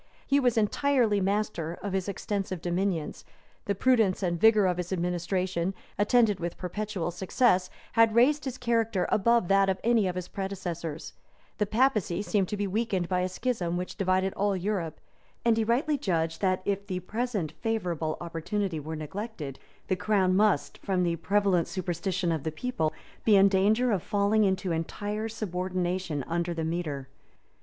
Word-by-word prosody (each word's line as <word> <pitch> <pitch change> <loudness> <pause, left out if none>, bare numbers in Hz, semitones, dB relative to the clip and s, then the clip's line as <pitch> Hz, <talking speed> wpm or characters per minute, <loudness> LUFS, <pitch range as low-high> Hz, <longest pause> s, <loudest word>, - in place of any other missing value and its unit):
He 280 - +3
was 245 -4 +2
entirely 225 -1 +2
master 195 -4 -1
of 200 -2 -3
his 190 0 -1
extensive 195 -2 -3
dominions: 175 -1 -2 0.4
the 200 - 0
prudence 220 -4 +2
and 175 -2 -1
vigor 215 -2 +6
of 180 -1 +1
his 180 0 -4
administration, 180 +1 -1 0.2
attended 210 -2 +3
with 170 0 -4
perpetual 190 -1 -3
success, 185 +1 +2 0.2
had 225 -1 +4
raised 285 +5 +4
his 260 -1 -4
character 230 -5 +1
above 235 -1 +3
that 195 0 +4
of 190 - 0
any 230 -4 +3
of 180 - -2
his 180 -1 -4
predecessors: 175 -6 -5 0.5
the 210 - +1
papacy 215 -6 +1
seemed 205 -3 +1
to 210 - -3
be 205 - -1
weakened 195 -3 -1
by 180 -1 +1
a 180 +1 0
schism 185 -5 -2
which 180 0 -4
divided 190 -1 +1
all 200 -1 0
Europe; 185 -4 -2 0.5
and 230 -1 +5
he 225 - +1
rightly 275 +6 +1
judged 165 - -1
that, 185 -1 +1
if 200 0 -1
the 185 -2 -2
present 210 -4 -2
favorable 175 -9 -1
opportunity 170 +1 -2
were 155 +2 -5
neglected, 155 - -6 0.3
the 185 - +1
crown 185 -1 +2
must, 210 +1 +2
from 185 -2 0
the 170 -1 0
prevalent 195 -1 +2
superstition 180 0 -2
of 160 -3 -1
the 160 - -3
people, 160 -2 -1 0.3
be 215 - +5
in 195 0 +7
danger 210 +6 +3
of 195 -5 +1
falling 205 +2 +2
into 190 -1 0
entire 205 +7 -3
subordination 180 -6 -2
under 170 +3 -2
the 165 -1 -2
mitre. 160 -5 -3
190 Hz, 165 wpm, -28 LUFS, 175-215 Hz, 0.5 s, in